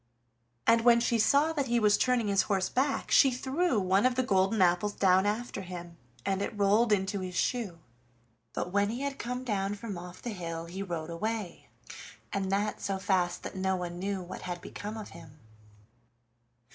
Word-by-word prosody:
And 230 0 +5
when 235 0 +6
she 235 0 +1
saw 285 +8 +4
that 280 -4 -1
he 240 0 +2
was 210 -2 +4
turning 250 -4 +1
his 200 -1 +3
horse 190 -2 +1
back 275 +2 0
she 270 - +7
threw 265 +2 0
one 190 +1 +2
of 255 -1 +3
the 255 - +2
golden 195 -1 +2
apples 180 +3 +3
down 190 0 +3
after 215 0 -2
him, 175 -2 -8 0.3
and 195 0 0
it 210 +1 -3
rolled 210 +3 +3
into 200 0 +1
his 185 -1 -5
shoe. 215 -5 -1 0.8
But 180 - -3
when 200 +1 +2
he 240 +4 -4
had 280 -1 -3
come 250 +1 -3
down 205 -4 -1
from 205 -4 -6
off 180 +1 -10
the 240 - -5
hill 165 -4 -5
he 180 +3 -6
rode 170 -4 -4
away, 210 +1 -4 0.6
and 195 -1 -1
that 205 +2 0
so 195 -1 -1
fast 190 -3 0
that - - -6
no 190 0 0
one 175 -1 -5
knew 195 0 -2
what 175 - -8
had 175 -1 -5
become 210 +4 -7
of 215 - -7
him. 155 -3 -13
200 Hz, 190 wpm, -30 LUFS, 185-235 Hz, 0.8 s, she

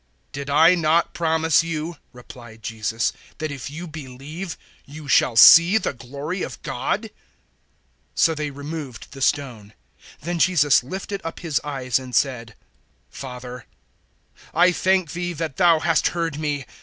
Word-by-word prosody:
011:040 - - -42
"Did 140 0 -6
I 160 +5 +6
not 165 -1 +1
promise 160 -1 +2
you," 165 0 -4
replied 120 -2 -13
Jesus, 110 +1 -2 0.2
"that 155 -1 -4
if 140 -1 -6
you 160 +5 -7
believe, 155 +3 -8 0.3
you 150 +1 -11
shall 130 -3 +3
see 170 - +9
the 195 - -2
glory 140 +9 -6
of - - -5
God?" - - -2
011:041 - - -8 1.1
So 165 - +3
they 150 -1 -3
removed 145 -3 -8
the 135 - -10
stone. 125 -8 -1 0.5
Then 170 +2 -3
Jesus 150 -7 +4
lifted 190 +7 -6
up 165 - -6
His 160 -5 -1
eyes 135 -4 -1
and 130 -1 -7
said, 120 -5 0 0.6
"Father, 125 -1 -9 0.9
I 175 +2 +5
thank 185 -2 +1
Thee 175 0 -3
that 160 -3 -5
Thou 170 -3 +4
hast 165 0 +2
heard 165 -4 -2
me. 145 -3 -2
150 Hz, 150 wpm, -22 LUFS, 130-165 Hz, 1.1 s, see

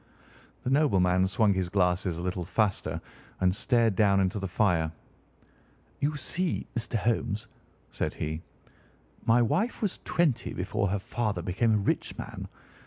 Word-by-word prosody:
The 125 - -1
nobleman 95 -11 +3
swung 105 0 +3
his 95 -2 -1
glasses 90 -2 +1
a 85 - -4
little 90 0 -2
faster 100 +3 0 0.4
and 90 -1 +3
stared 115 -2 +2
down 100 -2 +4
into 95 +2 +1
the 95 - -3
fire. 90 -4 +2 1.1
"You 145 +2 0
see, 170 +5 -2
Mr. 120 0 -2
Holmes," 110 0 0 0.4
said - - -2
he, 80 +1 -3 0.9
"my 120 +2 +5
wife 200 - 0
was 205 -4 -2
twenty 165 -8 +1
before 100 +3 -1
her 100 +2 0
father 105 -2 -2
became 105 +6 +2
a 100 -1 0
rich - - -1
man. - - -6
100 Hz, 145 wpm, -28 LUFS, 90-120 Hz, 1.1 s, my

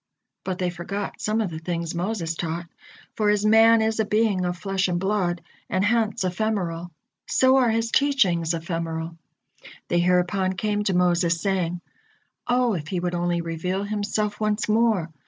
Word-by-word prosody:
But 185 -2 -3
they 180 -1 -1
forgot 195 +3 -5
some 215 +1 0
of 200 -5 -2
the 160 - -5
things 170 0 -3
Moses 175 -1 -2
taught, 165 +1 -4 0.5
for 210 -1 +1
as 210 0 +2
man 225 +1 +6
is 220 0 -1
a - - +4
being 210 -3 +1
of 180 0 -2
flesh 195 0 -1
and 175 -1 -1
blood, 190 -3 -1 0.3
and 185 +1 +1
hence 220 -3 +1
ephemeral, 180 -3 -2 0.4
so 260 0 +4
are 250 -3 +4
his 230 +1 0
teachings 185 - +2
ephemeral. 165 0 -4 0.7
They 175 - +2
hereupon 180 +2 +2
came 210 +2 -1
to 190 - +1
Moses, 175 -2 +2
saying: 180 -2 -1 0.7
"O, 245 -1 +2
if 155 -5 -4
He 180 +2 -2
would 175 0 -2
only 175 0 0
reveal 170 +4 -3
Himself 210 0 -2
once 215 0 0
more! 215 -6 +2
185 Hz, 165 wpm, -24 LUFS, 175-215 Hz, 0.7 s, man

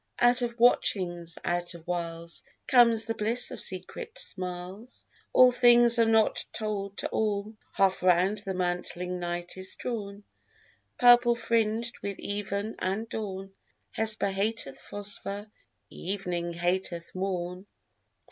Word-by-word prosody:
Out 245 +1 +5
of 235 -1 -3
watchings, 175 -8 +2
out 175 0 -2
of 165 -1 -13
wiles, 170 -1 -4 0.2
Comes 235 -3 +5
the 225 - -2
bliss 225 +3 +2
of - - -5
secret 470 0 -3
smiles, 185 - -5 0.3
All 255 0 +7
things 240 -1 +6
are 230 - +5
not 225 -1 +3
told 205 -2 -3
to - - -1
all, 210 0 -1 0.2
Half 195 -1 +2
round 185 +3 +3
the 195 -2 -4
mantling 180 0 -2
night 175 +1 -4
is 185 0 -6
drawn, 205 -4 -5 0.7
Purplefringed 235 -2 +4
with 200 -1 -4
even 205 +1 -4
and 195 +5 -2
dawn. 195 -3 -5 0.4
Hesper 220 -2 0
hateth 195 -8 -2
Phosphor, 205 0 -5 0.5
evening 175 -2 -3
hateth 175 0 -2
morn. 185 0 -4
200 Hz, 120 wpm, -28 LUFS, 180-225 Hz, 0.7 s, All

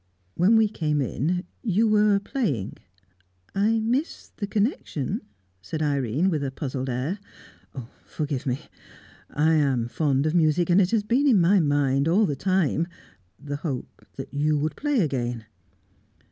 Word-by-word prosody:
When 195 +6 +4
we 220 -1 +5
came 155 -7 -1
in, 150 - -1 0.2
you 220 0 +2
were 210 -1 +4
playing." 185 - -2 0.8
"I 215 +3 +2
miss 250 +9 -2
the 205 - -4
connection," 200 - -1 0.4
said 155 - -4
Irene, 140 - +1
with 150 -4 -1
a 135 - -1
puzzled 135 -1 -4
air. 130 +11 -2 0.8
"Forgive 145 -3 -4
me. 130 +1 -1 0.7
I 155 +2 +2
am 135 -6 +2
fond 140 +1 0
of 155 - +1
music, 170 +1 +2
and 185 +3 +6
it 180 - +2
has 220 -1 +1
been 250 +7 +2
in 235 -8 +5
my 185 +3 +4
mind 145 -2 +2
all 195 +6 +4
the 145 -6 -1
time 170 0 +1 0.5
the 145 0 -5
hope 145 -5 -6
that - - -8
you 150 +1 +1
would 155 +2 -2
play 290 -5 +1
again." 120 - -2
155 Hz, 150 wpm, -25 LUFS, 140-200 Hz, 0.8 s, and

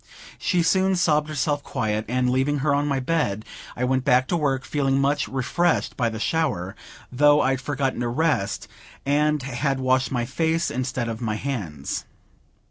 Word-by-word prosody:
She 175 -2 +1
soon 190 +3 +3
sobbed 155 -4 +2
herself 145 0 0
quiet; 110 -4 -2
and, 125 +2 +1
leaving 135 +3 +1
her 145 - +3
on 145 +1 +1
my 140 -2 0
bed, 125 -8 -1 0.3
I 125 - -3
went 130 0 +1
back 130 -1 +3
to - - +1
work, 135 -5 0
feeling 135 -2 +1
much 140 +1 +1
refreshed 160 +6 0
by 120 -5 +1
the 110 -1 -6
shower, 110 - -1 0.4
though 145 +3 +5
I'd 135 0 +1
forgotten 135 -2 -1
to 120 - -1
rest, 125 -5 0 0.4
and 150 0 +2
had 135 +1 -1
washed 130 -1 +1
my 120 -2 0
face 160 +5 0
instead 125 -1 -2
of 115 0 -5
my 110 -3 -1
hands. 100 - -4
135 Hz, 170 wpm, -24 LUFS, 125-150 Hz, 0.4 s, though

